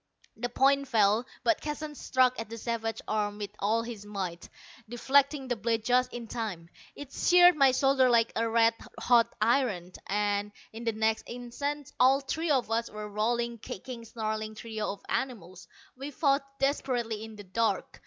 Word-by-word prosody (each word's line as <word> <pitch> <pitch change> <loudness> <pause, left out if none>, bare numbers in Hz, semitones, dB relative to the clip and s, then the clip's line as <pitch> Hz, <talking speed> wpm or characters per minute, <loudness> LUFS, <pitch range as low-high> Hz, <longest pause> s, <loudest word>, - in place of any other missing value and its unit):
The 245 +2 -3
point 275 +3 +3
fell, 220 0 +3 0.2
but 335 - +2
Keston 300 0 -5
struck 255 -3 +1
at 225 - -5
the 230 - -7
savage 225 -1 -3
arm 210 -1 -1
with 205 -1 -5
all 220 +3 +1
his 230 -3 -7
might, 190 -5 -5 0.4
deflecting 270 +3 +2
the 245 - 0
blade 225 0 -1
just 250 +1 +2
in 240 -1 -7
time. 205 -8 -5 0.3
It 290 -2 -10
seared 355 0 +6
my 275 -3 +5
shoulder 265 0 +3
like 230 -1 +3
a 230 0 0
red 230 0 +4 0.3
hot 240 -2 +4
iron, 215 -6 +1 0.2
and 205 0 0 0.2
in 230 +2 -8
the 230 - +2
next 220 +1 0
instant 280 +4 -5
all 265 +2 +5
three 315 +4 -3
of 260 -6 +1
us 230 +1 0
were 210 0 -7
a - - -5
rolling, 235 +3 -1
kicking, 230 +4 -8
snarling 215 -1 -4
trio 220 -1 -4
of 200 - -10
animals. 185 -9 -4 0.3
We 270 +3 -6
fought 280 -1 +1
desperately 245 -6 -1
in 220 -1 -9
the 205 - -10
dark. 225 +4 -1
230 Hz, 175 wpm, -29 LUFS, 215-265 Hz, 0.4 s, seared